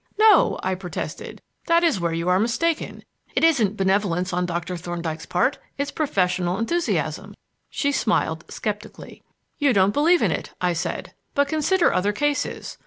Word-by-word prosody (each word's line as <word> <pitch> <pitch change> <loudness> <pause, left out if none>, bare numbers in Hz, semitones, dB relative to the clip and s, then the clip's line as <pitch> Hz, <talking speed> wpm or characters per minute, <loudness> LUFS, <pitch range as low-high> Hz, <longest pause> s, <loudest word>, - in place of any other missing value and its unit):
"No," 430 -3 +5
I 190 - 0
protested; 185 -1 -6 0.2
"that 335 +1 +4
is 320 - +2
where 170 -1 -1
you 165 +1 -2
are 180 +1 +3
mistaken. 305 +9 -1 0.3
It - - +1
isn't 235 -11 +3
benevolence 190 -2 +1
on 180 0 0
Doctor 175 +1 -3
Thorndyke's 170 -2 -5
part; 180 +11 +1 0.2
it's 280 +1 -2
professional 180 - 0
enthusiasm." 340 +10 -1 0.3
She 285 - 0
smiled 170 - 0
sceptically. 210 0 -6 0.4
"You 285 -4 +3
don't 195 0 +3
believe 335 +6 +4
in - - +2
it," - - -4
I 180 -1 +1
said; 160 - -4 0.2
"but 285 0 +3
consider 320 +4 +2
other 200 +3 +1
cases. 290 +6 -2
205 Hz, 155 wpm, -23 LUFS, 180-290 Hz, 0.4 s, No